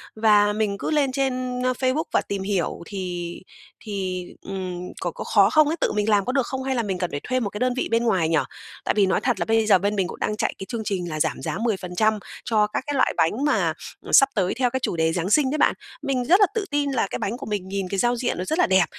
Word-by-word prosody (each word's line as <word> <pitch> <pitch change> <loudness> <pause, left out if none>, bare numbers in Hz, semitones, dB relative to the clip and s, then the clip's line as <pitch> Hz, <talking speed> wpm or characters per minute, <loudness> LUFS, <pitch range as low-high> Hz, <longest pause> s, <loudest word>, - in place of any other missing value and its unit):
và 210 -1 +4
mình 210 -2 -1
cứ - - -3
lên 285 -4 +2
trên, 255 -2 -1
ơ, 255 - +2
Facebook 260 +4 +1
và - - +3
tìm 200 -1 -4
hiểu 195 -3 -1
thì 180 -4 -4 0.5
thì, 190 -4 -4 0.2
ừm, 185 -2 -5 0.2
có 175 - -1
có - - -7
khó 200 -1 +4
không 310 +3 +5
ấy, 315 - 0
tự - - +2
mình 210 +1 +1
làm 205 -2 +3
có - - -1
được 260 -2 +1
không 265 0 -4
hay 265 0 -1
là 235 - 0
mình 190 -3 -2
cần 180 -1 -2
phải 145 - -3
thuê 255 0 0
một 215 -5 -2
cái 210 - -7
đơn 250 0 +1
vị - - 0
bên 230 +1 +2
ngoài 185 -8 +2
nhỉ? 165 - +3 0.5
Tại - - +2
vì 200 - +5
nói 190 - +1
thật 250 -2 0
là - - 0
bây 225 0 +2
giờ 205 -3 +6
bên 205 +3 -1
mình 190 -3 0
cũng - - -9
đang 210 - -1
chạy - - 0
cái 195 - -7
chương 230 -3 -3
trình 180 -4 -2
là 155 - -4
giảm - - 0
giá 155 - -3
10% 215 -1 0 0.3
cho 215 -2 +2
các 210 - -3
cái 290 - -1
loại - - +2
bánh 195 - +1
mà, 295 - +2 0.3
à, - - -7
sắp 275 - +7
tới 190 -3 +1
theo 250 0 +1
cái 260 +2 -2
chủ 180 - -2
đề 160 0 +1
Giáng 175 +1 -1
Sinh 265 +4 +3
đấy 305 - -1
bạn. - - +4 0.3
Mình 270 -4 -1
rất 365 +9 +5
là 405 - +7
tự 440 -3 -1
tin 290 -1 0
là 245 -6 +1
cái - - -5
bánh 225 +5 -2
của 275 - -8
mình 205 -3 -3
nhìn 195 -1 -3
cái 195 - -2
giao 240 0 +2
diện 245 -4 -2
nó 180 - -2
rất 315 - -1
là 360 - +5
đẹp, 190 -1 +4
215 Hz, 290 wpm, -24 LUFS, 190-255 Hz, 0.5 s, sắp